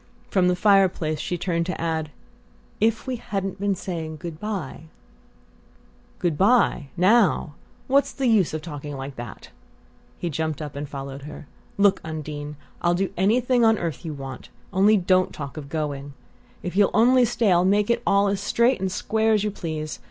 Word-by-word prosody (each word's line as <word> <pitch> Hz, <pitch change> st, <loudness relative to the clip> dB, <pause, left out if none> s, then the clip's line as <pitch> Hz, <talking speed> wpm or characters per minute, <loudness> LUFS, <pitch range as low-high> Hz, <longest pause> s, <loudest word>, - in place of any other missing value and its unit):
From 185 Hz, -2 st, +3 dB
the 180 Hz, -, +3 dB
fireplace 185 Hz, -6 st, +3 dB
she 175 Hz, +3 st, -2 dB
turned 170 Hz, -1 st, -1 dB
to 185 Hz, -, -3 dB
add 160 Hz, -2 st, -2 dB, 0.7 s
"if 220 Hz, +1 st, +1 dB
we 260 Hz, -2 st, -3 dB
hadn't 195 Hz, -3 st, -4 dB
been 200 Hz, 0 st, 0 dB
saying 165 Hz, -4 st, -5 dB
good 160 Hz, 0 st, -7 dB
bye?" 190 Hz, -8 st, -5 dB, 1.3 s
"Good 165 Hz, -4 st, -1 dB
bye 200 Hz, -, +3 dB
now? 190 Hz, -4 st, +3 dB, 0.3 s
What's 280 Hz, +1 st, +2 dB
the 270 Hz, -, -3 dB
use 220 Hz, -8 st, +3 dB
of 155 Hz, -, -5 dB
talking 145 Hz, -3 st, -6 dB
like 135 Hz, +1 st, -6 dB
that?" 120 Hz, -2 st, -9 dB, 0.7 s
He 175 Hz, -, -3 dB
jumped 155 Hz, 0 st, -2 dB
up 150 Hz, -3 st, -6 dB
and 145 Hz, 0 st, -5 dB
followed 140 Hz, -1 st, -7 dB
her. -, -, -10 dB, 0.3 s
"Look 200 Hz, -1 st, +4 dB
here, 160 Hz, -, -7 dB
Undine 150 Hz, -1 st, -6 dB, 0.3 s
I'll 175 Hz, 0 st, +2 dB
do 190 Hz, +1 st, -1 dB
anything 240 Hz, +6 st, +2 dB
on 225 Hz, -1 st, +5 dB
earth 165 Hz, -4 st, -4 dB
you 160 Hz, -3 st, -4 dB
want; 135 Hz, -2 st, -8 dB, 0.2 s
only 205 Hz, +3 st, +5 dB
don't 185 Hz, 0 st, +2 dB
talk 140 Hz, -2 st, -7 dB
of 145 Hz, -3 st, -8 dB
going! 145 Hz, -2 st, -4 dB, 0.5 s
If 180 Hz, -, -4 dB
you'll 200 Hz, 0 st, +5 dB
only 250 Hz, +3 st, +5 dB
stay 230 Hz, -3 st, +2 dB
I'll 175 Hz, 0 st, +4 dB
make 205 Hz, +4 st, +3 dB
it -, -, +1 dB
all 200 Hz, 0 st, +3 dB
as 200 Hz, 0 st, 0 dB
straight 235 Hz, +4 st, +2 dB
and 190 Hz, -1 st, -1 dB
square 220 Hz, +3 st, +1 dB
as 210 Hz, -2 st, +2 dB
you 210 Hz, -, -1 dB
please. 155 Hz, -5 st, -5 dB
180 Hz, 180 wpm, -24 LUFS, 155-205 Hz, 1.3 s, on